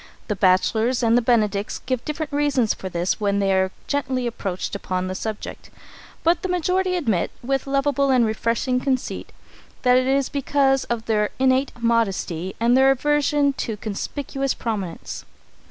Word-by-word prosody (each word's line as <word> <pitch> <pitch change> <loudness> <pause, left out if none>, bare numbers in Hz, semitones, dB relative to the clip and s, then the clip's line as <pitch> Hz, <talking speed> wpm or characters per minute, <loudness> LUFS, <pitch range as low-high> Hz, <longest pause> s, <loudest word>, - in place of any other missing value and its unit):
The 210 - 0
bachelors 220 +6 +2
and 230 +1 +4
benedicts 210 -4 +1
give 255 -2 -1
different 305 0 -4
reasons 285 -6 +2
for 190 - -7
this 175 +1 -1
when 200 -1 +1
they 195 -1 +2
are 190 0 +2 0.2
gently 260 -3 -1
approached 195 -6 -3
upon 185 -2 -2
the 185 - -3
subject, 215 +2 -6 0.5
but 335 +1 +3
the 375 - -3
majority 365 +1 +1
admit, 225 - 0
with 270 +2 -1
lovable 275 0 +1
and 255 -3 +4
refreshing 230 +3 0
conceit, 260 -1 -2 0.5
that 250 -1 +5
it 255 0 +2
is 275 0 +2
because 275 -1 +1
of 235 -1 -3
their 210 -2 +1
innate 265 +1 +2
modesty 195 -6 0
and 235 +2 +3
their 265 +1 +6
aversion 290 +1 +2
to 225 -3 -3
conspicuous 270 +6 -3
prominence. 200 -7 -4
245 Hz, 155 wpm, -23 LUFS, 210-275 Hz, 0.5 s, their